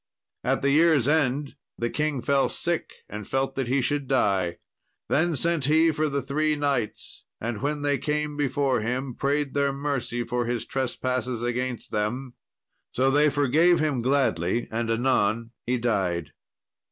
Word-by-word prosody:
At - - 0
the 140 - +3
year's 155 -4 +4
end 145 -2 +1 0.2
the 120 0 -2
king 150 -5 -1
fell 140 -1 +2
sick 170 -1 -1 0.2
and 105 -1 -7
felt 135 0 -1
that 135 -3 -2
he 130 +2 +2
should 145 +1 -1
die. 95 -9 +1 0.5
Then 165 +2 +2
sent 165 0 +1
he 160 +3 +4
for 155 0 0
the 140 -1 -2
three 150 +3 0
knights, 140 -7 -2 0.2
and 115 -1 -4
when 145 +1 -1
they 145 -1 +1
came 150 0 -1
before 135 -3 +1
him 125 +3 -2
prayed 140 +2 -1
their 140 -1 +2
mercy 135 -4 -2
for 120 +1 -2
his 120 -1 -2
trespasses 125 -2 -2
against 120 0 -3
them. 120 +5 -2 0.6
So 135 +2 +2
they 150 +2 +4
forgave 150 +5 +3
him 150 -5 0
gladly, 120 -6 +1
and 115 0 -2
anon 115 -1 +1 0.2
he 125 +1 +1
died. 90 -10 -1
135 Hz, 155 wpm, -26 LUFS, 120-145 Hz, 0.6 s, year's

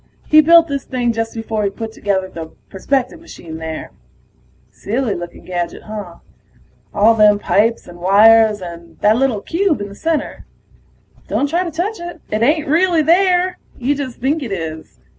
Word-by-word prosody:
He 310 0 +6
built 335 +2 +6
this 280 -2 -3
thing 245 -2 -1
just 225 0 -3
before 225 -1 -3
he 200 - +1
put 220 +2 -7
together 200 -3 -2
the 165 -3 -8 0.2
perspective 265 - -1
machine 170 - -10
there. 160 -1 -6 0.8
Silly 230 +1 -2
looking 175 0 -8
gadget, 175 -2 -4
huh? 210 -5 -7 0.8
All 220 +3 +4
them 210 -2 +5
pipes 220 +3 +1
and 175 0 -12
wires 210 +3 +5
and 170 -1 -10
that 210 +1 +4
little 245 -4 0
cube 345 - 0
in 205 0 -5
the - - -11
center... 320 +4 -3 0.8
don't 285 - 0
try 345 +2 +1
to 350 - -4
touch 350 +6 -3
it, 345 0 -8
it 215 +1 -1
ain't 300 +5 +2
really 335 +1 +3
there. 360 +2 +2 0.2
You 260 +3 0
just 275 -4 -6
think 285 +5 0
it 245 -6 -5
is. 160 -4 -6
225 Hz, 170 wpm, -18 LUFS, 200-310 Hz, 0.8 s, He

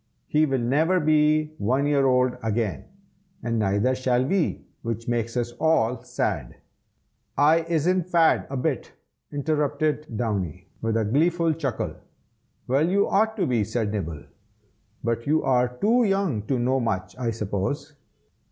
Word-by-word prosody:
He 155 +1 +2
will 135 -1 0
never 150 +10 +2
be 155 0 +2
one 130 +7 +1
year 140 -2 +3
old 125 -1 +2
again, 110 -2 -2 0.6
and 115 -1 -1
neither 105 +5 +2
shall 130 -1 +1
we, 185 +4 0 0.2
which 115 -1 -4
makes 115 0 -1
us 120 0 -1
all 125 -7 +2
sad." - - -3 0.8
"I 155 +3 +5
isn't 170 +2 +1
fad 165 -2 +3
a 135 - -3
bit!" 125 - -2 0.4
interrupted 150 -2 -1
Downy, 100 -8 -3
with 115 0 0
a 110 - +1
gleeful 165 +7 +2
chuckle. 140 -7 -3 0.7
"Well, 140 +6 +2
you 200 +2 +2
ought 220 +2 +1
to 195 - +1
be!" 120 -4 +1
said 110 0 -2
Nibble, 80 -8 -4 0.8
"but 115 +1 -2
you 155 +2 +2
are 125 -1 +1
too 235 - +3
young 195 - 0
to 135 - +1
know 130 +2 +1
much, 100 -6 -2
I 125 -2 -2
suppose. 110 +7 -3
130 Hz, 145 wpm, -25 LUFS, 115-155 Hz, 0.8 s, I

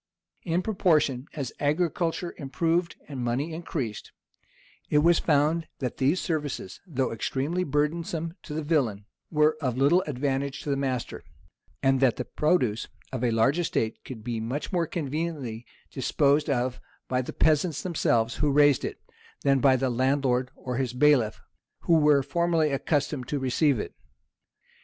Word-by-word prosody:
In 175 +1 -1
proportion 155 - +1
as 140 -5 -4
agriculture 165 +3 0
improved 165 +4 0
and 135 -4 -5
money 135 +7 -1
increased, 140 -10 -4 0.8
it 150 - +3
was 165 +3 +5
found 155 +2 +2
that 125 -3 -4
these 145 +7 +2
services, 145 - -3
though 135 -6 -1
extremely 140 +10 -1
burdensome 160 +2 -1
to 150 - -7
the 160 - -2
villain, 125 -10 0 0.2
were 155 0 +3
of 130 -4 -1
little 145 +7 +4
advantage 140 0 -2
to 145 - -2
the - - +2
master; 130 -3 -3 0.6
and 135 0 +3
that 130 -3 +3
the 125 - -4
produce 130 -9 +1 0.2
of 130 -2 -3
a 120 - +3
large 115 +8 +2
estate 115 -9 -1
could 115 -5 -9
be 120 -1 -3
much 130 - -4
more 170 -2 +1
conveniently 150 -7 -4 0.2
disposed 145 +3 +2
of 125 -2 -1 0.3
by 125 0 0
the 125 - -6
peasants 155 0 +1
themselves, 120 -10 +1
who 150 - +2
raised 145 -1 +4
it, - - -4 0.4
than 140 -1 +4
by 130 +1 +5
the 130 0 0
landlord 130 0 +1
or 125 -1 -5
his 130 -2 -1
bailiff, 125 -4 +3 0.4
who 165 -2 +4
were 150 -2 +4
formerly 165 +1 +1
accustomed 140 -1 -1
to 145 - -1
receive 135 0 +2
it. - - -5
140 Hz, 150 wpm, -27 LUFS, 130-160 Hz, 0.8 s, was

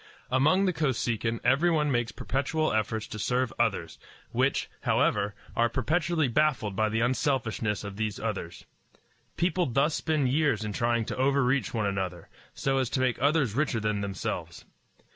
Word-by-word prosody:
Among 155 +10 +4
the 185 - +1
Kosekin 120 -6 -1
everyone 150 +1 +3
makes 120 -3 0
perpetual 140 +7 -1
efforts 110 0 -1
to 110 - -7
serve 125 +2 0
others, 100 -8 0 0.3
which, - - +1
however, 100 +1 +1 0.2
are 120 0 +3
perpetually 155 +5 +1
baffled 125 -6 +1
by 110 +2 +2
the 110 +1 0
unselfishness 120 -5 0
of 100 -1 -7
these 110 -2 -2
others. 100 -6 -4 0.7
People 175 0 +1
thus 135 +5 +2
spend 150 -5 0
years 140 -6 +1
in 105 - -3
trying 115 +1 +1
to - - -5
overreach 135 0 +2
one 110 -3 -1
another, 95 -3 -3 0.3
so 135 0 0
as 130 -3 0
to - - -1
make 130 -2 0
others 145 -5 +2
richer 135 -3 0
than 105 -1 -1
themselves. 100 -3 -4
125 Hz, 155 wpm, -28 LUFS, 110-145 Hz, 0.7 s, Among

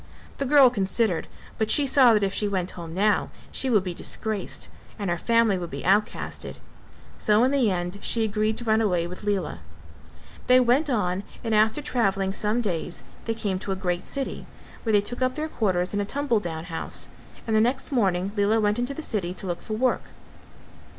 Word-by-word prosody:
The 275 - -1
girl 275 -2 +7
considered 195 -3 0 0.3
but 220 -1 +1
she 290 - +5
saw 265 -3 +6
that 210 - +2
if 195 -1 0
she 210 - 0
went 185 -3 -1
home 170 -2 -8
now 205 +5 +1 0.2
she 265 - -2
would 210 -6 +3
be 180 -2 -4
disgraced 215 +3 -1 0.3
and 200 -5 -2
her 175 - 0
family 230 -3 +3
would 175 -1 -5
be - - -6
outcasted, 205 +3 0 0.6
so 215 +2 +4
in 260 - +3
the 265 -6 +3
end 180 +1 -3
she 230 - +1
agreed 215 0 0
to - - -3
run 220 -1 +2
away 180 -6 +1
with 180 +4 -8
Lela. 200 -5 -1 0.9
They 255 0 +7
went 255 +5 +3
on 190 -6 0 0.2
and 225 -2 -1
after 220 +7 +3
travelling 195 -7 0
some 215 +4 0
days 175 -5 -3 0.2
they 225 - -1
came 200 -4 -2
to 195 - -4
a - - 0
great 180 -2 -2
city, 275 -1 -4 0.3
where 225 - -1
they 205 -1 +5
took 245 +5 -6
up 255 0 +1
their 310 0 -2
quarters 185 - -1
in 205 - 0
a - - 0
tumble 275 0 0
down 160 -5 -5
house 165 -2 -4 0.4
and 220 - 0
the 215 - +5
next 255 +5 0
morning 195 -6 +1
Lela 210 +2 +2
went 210 +1 +1
into 250 +3 -2
the 315 - -5
city 185 -8 -2
to 190 - -8
look 175 -2 -3
for 215 - -6
work. 250 +4 +1
210 Hz, 205 wpm, -25 LUFS, 190-240 Hz, 0.9 s, girl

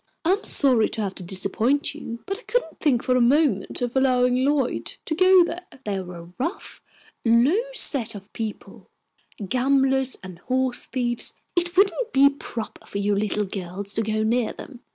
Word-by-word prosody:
"I 340 - +4
am 405 +2 +1
sorry 250 -6 +4
to 220 - -3
have 195 -2 -2
to - - -7
disappoint 200 +9 +1
you, 230 0 -8
but 395 +1 -4
I - - -15
couldn't - - -2
think 265 -6 +2
for 255 - +1
a 250 - +3
moment 250 -4 +2
of 245 +1 -3
allowing 255 -1 +3
Lloyd 280 -2 0
to - - -2
go 370 +2 +6
there. 350 +2 -5 0.2
They 205 -2 -1
are 180 -1 -8
a 170 +1 -12
rough, 335 +10 -4 0.4
low 245 - +4
set 235 - 0
of 195 0 -11
people, 220 -2 -7 0.6
gamblers 265 +2 +2
and 185 -2 -10
horse 255 +3 -1
thieves. 240 -2 -1 0.2
It 350 +1 -1
wouldn't 400 +4 +2
be 275 +1 +6
proper 235 -5 -8
for - - -5
you 205 +1 +1
little 210 0 0
girls 195 +1 -5
to 225 - +1
go 215 0 -1
near 230 +1 +1
them. 255 -4 -11
250 Hz, 180 wpm, -24 LUFS, 215-290 Hz, 0.6 s, go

